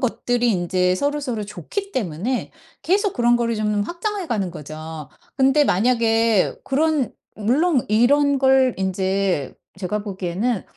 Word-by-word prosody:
것들이 245 -1 0
인제 180 0 +1
서로서로 280 -2 -2
좋기 210 - -6
때문에 215 +3 -2 0.3
계속 395 +2 +1
그런 240 0 +3
거를 235 -1 -1
좀 210 -1 0
확장해 365 - -4
가는 205 - -1
거죠. 155 -1 -8 0.3
근데 270 +2 +4
만약에 225 -1 +2
그런 295 -1 +1 0.3
물론 260 +6 +2
이런 280 +6 +3
걸 265 -1 +4
인제 190 -4 -1 0.2
제가 195 +2 -2
보기에는 195 +3 -2
230 Hz, 270 characters per minute, -21 LUFS, 190-270 Hz, 0.3 s, 근데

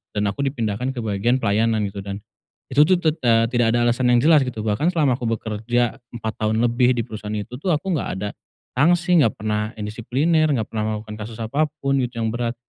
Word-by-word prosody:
dan 105 - 0
aku 100 - -14
dipindahkan 125 0 -2
ke 120 - -4
bagian 110 +3 +1
pelayanan 110 -2 +1
gitu 100 - -7
dan, 100 +1 -6 0.5
itu 145 - +5
tuh 185 - +5
tet 160 -2 0
eee, 115 0 +5
tidak 120 -2 +2
ada 120 - +2
alasan 120 +1 +2
yang 120 0 +4
jelas 155 -1 +6
gitu 110 -4 -4
bahkan 110 +9 0
selama 150 -8 +2
aku 120 - -2
bekerja 115 +2 -1 0.2
4 110 -1 -4
tahun 110 +1 +1
lebih 120 +1 +3
di 115 - -1
perusahaan 105 0 -6
itu 115 +5 -6
tuh 185 - -3
aku 190 +6 -3
nggak 160 - -1
ada 105 - -2 0.4
sanksi, 175 +5 +3
nggak 115 -8 +3
pernah 105 0 -2
indisipliner, 125 +10 0
nggak 110 -3 -1
pernah 110 -1 -1
melakukan 105 0 -7
kasus 115 -1 -10
apapun 140 +2 0
gitu 120 -2 -2
yang 110 - 0
berat, 120 0 -2
120 Hz, 210 wpm, -22 LUFS, 110-135 Hz, 0.5 s, jelas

